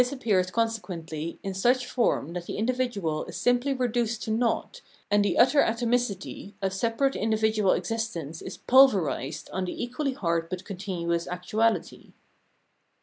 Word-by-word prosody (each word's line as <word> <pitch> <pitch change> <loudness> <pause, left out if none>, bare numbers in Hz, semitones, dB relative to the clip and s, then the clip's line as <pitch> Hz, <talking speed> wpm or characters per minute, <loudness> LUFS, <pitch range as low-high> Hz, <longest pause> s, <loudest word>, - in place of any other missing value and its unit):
This 250 +1 0
appears 205 -9 +1
consequently 180 -8 -3
in 195 - -3
such 245 +6 +2
form 230 - 0
that 175 -1 -5
the - - -4
individual 220 -9 -1
is - - -7
simply 245 +3 +2
reduced 240 -3 -1
to 220 - -3
naught, 240 - -1 0.3
and 205 0 +4
the 205 - 0
utter 275 +4 +6
atomicity 230 -4 -1
of 195 -2 -1
separate 230 +7 0
individual 220 -2 +2
existence 175 -6 -3
is - - -7
pulverised 180 - +3
on 185 0 -1
the 180 - -4
equally 265 +3 -2
hard 170 -6 -1
but 185 +1 -5
continuous 180 -4 -3
actuahty. 215 +6 -1
215 Hz, 145 wpm, -27 LUFS, 180-245 Hz, 0.3 s, utter